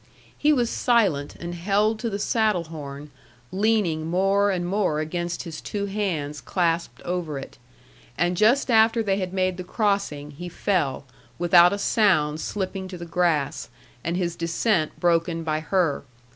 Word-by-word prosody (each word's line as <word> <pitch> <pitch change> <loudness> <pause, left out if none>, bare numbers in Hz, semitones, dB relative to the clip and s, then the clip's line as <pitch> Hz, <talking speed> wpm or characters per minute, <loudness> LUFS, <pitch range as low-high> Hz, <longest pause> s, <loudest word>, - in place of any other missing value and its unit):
He 300 - +2
was 245 -5 +2
silent, 195 - +1
and 170 0 -6
held 205 +5 +1
to 235 - -2
the 200 - -3
saddle 215 -3 +1
horn, 150 -2 -8 0.4
leaning 190 -6 +1
more 195 +4 +2
and 180 -3 -1
more 185 -4 0
against 175 +2 -3
his 165 -3 -7
two 200 -1 -3
hands 170 -9 -3
clasped 170 +4 -1
over 175 -5 -3
it; 135 - -9 0.6
and 175 +1 +1
just 240 +7 +3
after 225 0 +4
they 195 -1 0
had 185 -2 -3
made 185 -1 0
the 185 - -5
crossing 195 -8 -1
he 175 +5 -8
fell, 170 -7 -1 0.3
without 175 0 +6
a 200 - -1
sound 175 -8 +2
slipping 190 -1 -4
to 185 -1 -8
the 170 - -7
grass, 160 -5 0 0.3
and 170 +1 -1
his 175 -2 -1
descent 170 0 0
broken 165 -1 +1
by 155 -1 -1
her. 165 -2 0
180 Hz, 160 wpm, -24 LUFS, 160-200 Hz, 0.6 s, without